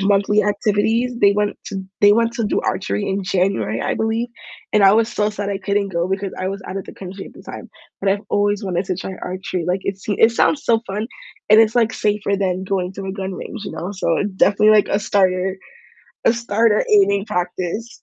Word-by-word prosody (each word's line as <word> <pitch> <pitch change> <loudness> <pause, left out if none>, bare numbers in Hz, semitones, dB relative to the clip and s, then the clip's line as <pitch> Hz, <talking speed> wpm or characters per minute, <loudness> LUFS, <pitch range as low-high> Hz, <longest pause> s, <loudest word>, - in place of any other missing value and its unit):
monthly 200 +1 +3
activities, 215 +4 +1
they 200 -3 +5
want 205 0 -1
to 195 -1 -5 0.2
they 205 0 +7
want 230 +2 +2
to 230 - -1
do 210 - 0
archery 105 - -2
in 195 +1 -1
January, 185 - 0
I - - -1
believe, 225 +2 -1 0.4
and 210 - +4
I 195 0 +7
was 225 +1 +3
so 210 -2 0
sad 205 -1 -4
I 195 - -2
couldn't 200 +1 -1
go 170 -1 -1
because 195 0 -2
I 185 - -2
was 195 0 -5
outta 195 +1 -4
the - - -9
country 190 +1 -8
at - - -13
the - - -13
time, - - -9 0.3
but 195 - 0
I've 200 +1 +1
always 205 0 +1
wanted 185 -1 -1
to 185 - -2
try 190 +1 -5
archery, 185 -1 -4
like, 180 +2 0
it 195 -1 -3
seem 205 +1 -3
it 225 - +6
sounds 280 +5 +2
so 225 -1 +3
fun, 210 +3 -3 0.4
and 215 - +8
it's, 225 0 +3
like, 230 -2 +2
safer 205 -1 0
than 190 -2 -1
going 185 -1 -2
to 195 0 -7
a 190 - -3
gun 190 -1 -5
range, 220 +3 -7
you - - -6
know? 165 +4 -5
So 175 -4 0
definitely, 205 +2 +4
like, 210 -1 +5
a 200 - +1
starter 190 -1 +1 0.7
a - - +5
starter 230 -2 +1
aiming 200 -1 +4
practice. 180 +5 -3
200 Hz, 220 wpm, -20 LUFS, 190-210 Hz, 0.7 s, and